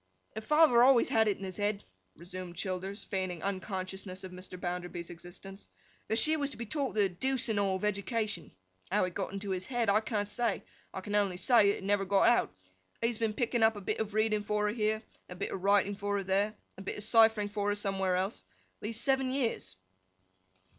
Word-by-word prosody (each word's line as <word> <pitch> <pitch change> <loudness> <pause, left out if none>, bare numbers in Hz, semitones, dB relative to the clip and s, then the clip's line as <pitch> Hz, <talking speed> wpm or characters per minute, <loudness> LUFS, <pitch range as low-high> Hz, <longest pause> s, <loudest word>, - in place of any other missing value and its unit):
'Her 220 - -5
father 300 -1 +5
always 250 -1 +6
had 220 -1 +3
it 205 - +1
in - - -9
his 185 -2 -5
head,' 205 0 -1 0.3
resumed 175 0 -7
Childers, 190 +2 -3
feigning 185 -4 -3
unconsciousness 190 -1 -4
of 185 - -7
Mr. 185 0 -8
Bounderby's 175 -1 -4
existence, 175 +3 -10 0.4
'that 220 - 0
she 310 +6 +4
was 285 -2 -1
to - - -6
be 235 - -5
taught 275 +1 -2
the 205 -2 +4
deuce 255 +7 0
and 215 -2 +1
all 195 -1 +1
of 190 - -3
education. 210 -2 -2 0.4
How - - +3
it 180 - -5
got 195 0 -3
into 200 0 -4
his 185 0 -2
head, 240 -5 +1
I 210 - +4
can't 215 -2 -2
say; 230 0 -1 0.3
I 190 - -5
can 205 +2 -6
only 200 -3 +2
say 230 +1 +5
that 200 - +1
it - - -10
never 200 0 +2
got 195 +1 +4
out. 240 - +3 0.5
He - - -1
has 235 - -4
been 225 -2 0
picking 240 0 0
up 220 0 +5
a 205 - -7
bit - - -2
of 215 -1 -3
reading 215 -1 +2
for 210 0 0
her, 210 - 0
here—and 215 -1 0 0.3
a 180 - -7
bit 180 - -4
of 190 - -4
writing 200 +1 +3
for 205 0 -2
her, 200 - -2
there—and 200 +3 +1 0.2
a - - -7
bit 195 - -4
of 210 - -2
ciphering 220 -2 +5
for 205 0 -1
her, 205 - +1
somewhere 195 -2 0
else—these 210 +3 -4
seven 265 +1 +2
years. 230 - -2
205 Hz, 215 wpm, -31 LUFS, 190-220 Hz, 0.5 s, always